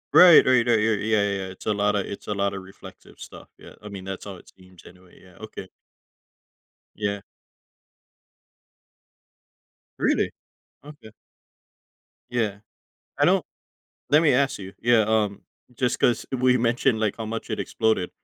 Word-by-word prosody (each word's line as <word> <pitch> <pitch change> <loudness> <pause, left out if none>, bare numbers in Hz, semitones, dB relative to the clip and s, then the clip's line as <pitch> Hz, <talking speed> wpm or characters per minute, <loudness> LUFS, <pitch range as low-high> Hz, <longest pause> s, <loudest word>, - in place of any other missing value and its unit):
Right, 175 -3 +9
right, 125 -2 +4
right. 115 -2 +4
Yeah, 110 +1 +2
yeah, 110 0 +1
yeah. 100 -1 -2
It's 95 0 -12
a 110 - +1
lotta 105 0 +1
it's 100 - -9
a 105 - -2
lotta 100 -1 -1
reflective 95 +1 -15
stuff, - - -12
yeah. - - -14
I 105 - -9
mean, 100 -2 -8
that's 95 0 -7
how 100 -2 -7
it - - -17
seems, 95 -2 -19
anyway. 90 0 -18
Yeah, 90 -2 -19
okay. 105 -3 -9 1.3
Yeah. 100 -1 -3 2.8
Really? - - +1 0.5
Okay. 145 -7 -13 1.2
Yeah. 110 -5 -1 0.6
I - - +3
don't - - +2 0.7
let 150 +2 +5
me 155 - +4
ask 140 -2 +1
you 95 -1 -9
yeah, 120 -1 +4
um, 105 -2 0 0.3
just 125 +1 -1
'cause 120 -2 +1
we 130 0 +3
mentioned, 120 0 +1
like, 110 -2 -1
how 110 - -5
much 115 +1 -6
it 110 - -2
exploded. 110 -5 0
105 Hz, 150 wpm, -24 LUFS, 100-120 Hz, 2.8 s, Right